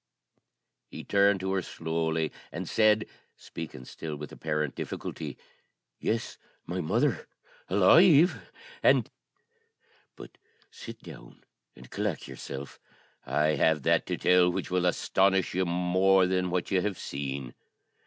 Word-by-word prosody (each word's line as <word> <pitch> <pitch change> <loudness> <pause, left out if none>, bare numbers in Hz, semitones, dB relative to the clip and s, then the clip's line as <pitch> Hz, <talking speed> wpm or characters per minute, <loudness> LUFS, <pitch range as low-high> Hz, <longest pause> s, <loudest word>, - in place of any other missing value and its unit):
He - - -8
turned 100 -1 +3
to 95 0 -2
her 95 - 0
slowly, 80 -1 -2 0.2
and - - -5
said, 110 -1 +3 0.3
speaking 75 -6 -9
still 80 +3 -7
with 75 0 -8
apparent 75 -2 -2
difficulty, - - -6 0.6
"Yes, 115 +1 -2 0.3
my 90 +2 -3
mother, 80 - 0 0.4
alive, 155 - +5 0.3
and - - +4 1.1
but - - -13 0.3
sit 115 -1 -10
down - - -13 0.3
and 65 -1 -15
collect - - -3
yourself; 70 +1 -8 0.5
I 75 +1 +2
have 75 -1 +2
that - - +2
to - - -2
tell 90 -1 +4
which 90 - -4
will 90 -1 +1
astonish 95 +1 +1
you 95 +1 +1
still 85 - -3
more 95 +2 +3
than 90 0 0
what 90 +1 -2
you 95 -2 +2
have 100 -1 -2
seen." 70 -2 -5
90 Hz, 130 wpm, -28 LUFS, 80-95 Hz, 1.1 s, alive